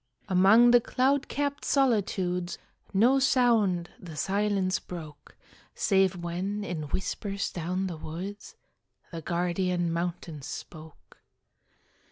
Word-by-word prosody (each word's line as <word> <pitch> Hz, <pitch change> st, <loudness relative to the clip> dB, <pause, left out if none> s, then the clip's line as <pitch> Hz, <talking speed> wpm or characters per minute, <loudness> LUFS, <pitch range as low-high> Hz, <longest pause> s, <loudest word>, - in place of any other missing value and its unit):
Among 200 Hz, +6 st, +6 dB
the 245 Hz, 0 st, +6 dB
cloud 270 Hz, +4 st, +1 dB
capt 285 Hz, 0 st, -2 dB
solitudes, 190 Hz, -9 st, +1 dB, 0.3 s
No 240 Hz, +7 st, +4 dB
sound 225 Hz, -10 st, +2 dB
the 165 Hz, -4 st, -10 dB
silence 195 Hz, +2 st, 0 dB
broke, 155 Hz, -5 st, -10 dB, 0.4 s
Save 190 Hz, -2 st, +2 dB
when, 180 Hz, +4 st, -3 dB
in 160 Hz, -6 st, -4 dB
whispers 200 Hz, +3 st, -3 dB
down 180 Hz, +3 st, -2 dB
the 175 Hz, -4 st, -4 dB
woods, 185 Hz, +7 st, -7 dB, 0.6 s
The 165 Hz, -1 st, -6 dB
guardian 175 Hz, 0 st, 0 dB
mountains 170 Hz, -4 st, -4 dB
spoke. 155 Hz, -2 st, -10 dB
185 Hz, 105 wpm, -28 LUFS, 175-210 Hz, 0.6 s, Among